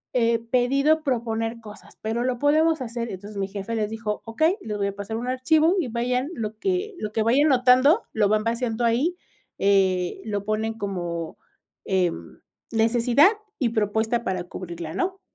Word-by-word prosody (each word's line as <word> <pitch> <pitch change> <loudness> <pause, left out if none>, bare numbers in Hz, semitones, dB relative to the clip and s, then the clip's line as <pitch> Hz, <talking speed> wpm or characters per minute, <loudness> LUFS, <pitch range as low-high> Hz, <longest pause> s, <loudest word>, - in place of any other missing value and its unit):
eh, 230 -1 +3
pedido 275 +5 +3
proponer 230 -4 -2
cosas, 210 -1 -13
pero 225 +2 -1
lo 250 -1 -1
podemos 310 +2 +3
hacer". 235 -1 -4
Entonces, 200 +2 -8
mi 195 -1 -1
jefe 200 +3 -5
les 215 -2 -1
dijo: 220 -1 -4
"Okey 315 - +1
les 210 - -4
voy 200 -1 0
a 200 - -4
pasar 200 +2 -5
un 240 +2 -4
archivo 310 +7 +3
y 320 - -1
vayan 250 +4 -1
lo 215 -1 -4
que 385 - -1
lo 210 - -4
que 220 - +1
vayan 260 +7 +4
notando, 260 - +5
lo 215 -2 +3
van 215 0 +2
vaciando 230 0 -1
ahí, 260 +10 +1 0.4
eh, 190 -3 +2
lo 205 -2 -2
ponen 215 +1 -1
como, 175 -5 -4 0.5
em, 180 - -1 0.3
necesidad 235 - +4 0.3
y 250 -5 +2
propuesta 220 +2 0
para 185 -5 -2
cubrirla", 170 -2 -7
¿no?, 380 +1 -2
230 Hz, 170 wpm, -24 LUFS, 210-255 Hz, 0.5 s, notando